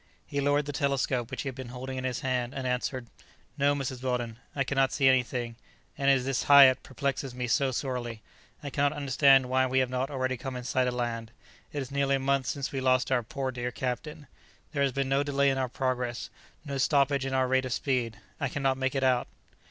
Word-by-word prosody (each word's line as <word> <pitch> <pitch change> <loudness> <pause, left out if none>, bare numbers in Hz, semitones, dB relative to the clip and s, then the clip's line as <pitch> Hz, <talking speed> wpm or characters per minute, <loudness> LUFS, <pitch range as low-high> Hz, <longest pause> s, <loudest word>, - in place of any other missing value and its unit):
He 140 - -2
lowered 145 +1 +2
the 145 - -5
telescope 135 -4 0
which - - -4
he - - -5
had 135 - -3
been 130 -1 -8
holding 130 +2 -6
in 130 0 -4
his 125 -2 -2
hand, 125 -1 -1
and 135 -1 -4
answered, 125 0 -2 0.5
"No, 145 0 +2
Mrs. 130 -2 -4
Weldon, 120 -3 -2 0.2
I 140 - +1
cannot 135 0 +1
see 135 -2 +2
anything; 125 -2 +1 0.4
and 140 0 +1
it - - +7
is 130 -1 -1
this 135 -1 -1
Hiat 135 -2 +8
perplexes 135 -1 -3
me 125 0 -2
so 135 +3 +2
sorely. 120 -3 -4 0.4
I 140 - -5
cannot 145 +2 +1
understand 135 -2 +4
why 130 +1 +2
we 130 +1 0
have 130 -1 +2
not 130 +1 -1
already 130 -2 -1
come 130 +2 -6
in 125 - -5
sight 130 0 +1
of 125 - -1
land. 115 -2 -3 0.4
It 145 -2 -3
is 130 - -11
nearly 140 0 +2
a - - -1
month 135 -1 +1
since 140 +2 -2
we 135 - -3
lost 130 0 +2
our 125 -2 +3
poor 130 +3 -4
dear 125 -1 -3
captain. 145 +5 -4 0.5
There 140 - -2
has 140 -1 +3
been 135 +1 -1
no 135 +1 +2
delay 140 -1 +2
in 135 - -1
our 130 -1 -1
progress; 125 -1 -2 0.3
no 140 -1 -3
stoppage 140 -1 +2
in 135 - -2
our 130 -1 +2
rate 130 0 +2
of 130 - -4
speed. 125 -6 -1 0.2
I 135 - -1
cannot 135 -1 0
make 130 +1 -1
it 135 - 0
out." 125 -2 +2
130 Hz, 230 wpm, -28 LUFS, 125-140 Hz, 0.5 s, Hiat